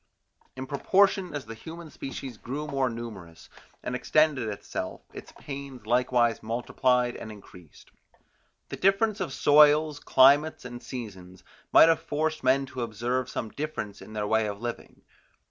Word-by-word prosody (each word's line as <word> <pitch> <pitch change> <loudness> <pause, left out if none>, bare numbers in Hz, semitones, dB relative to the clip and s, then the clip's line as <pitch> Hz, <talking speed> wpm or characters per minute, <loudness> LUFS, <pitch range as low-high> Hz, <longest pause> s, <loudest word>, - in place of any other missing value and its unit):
In 130 0 -5
proportion 190 +6 +2
as 145 -4 -5
the 115 - -8
human 160 +7 -10
species 135 -2 -7
grew 140 +7 -5
more 135 -3 0
numerous, 105 -8 -9 0.3
and - - -4
extended 140 -2 +2
itself, 100 - -5
its - - -10
pains 135 -5 -8
likewise 120 -1 +2
multiplied 125 +2 0
and 110 - -8
increased. 90 -6 -15 0.8
The - - -6
difference 200 +2 +2
of - - -3
soils, 150 +1 +5
climates 140 +3 +4
and 120 0 -8
seasons, 95 -8 -9 0.3
might - - +8
have 165 0 +3
forced 155 0 -2
men 135 +1 +3
to 130 -2 -7
observe 120 +3 -2
some 115 - -4
difference 125 -8 -5
in 110 - -11
their 105 -1 -2
way 110 +1 +2
of 100 -1 -5
living. 120 +1 -7
130 Hz, 145 wpm, -27 LUFS, 115-150 Hz, 0.8 s, might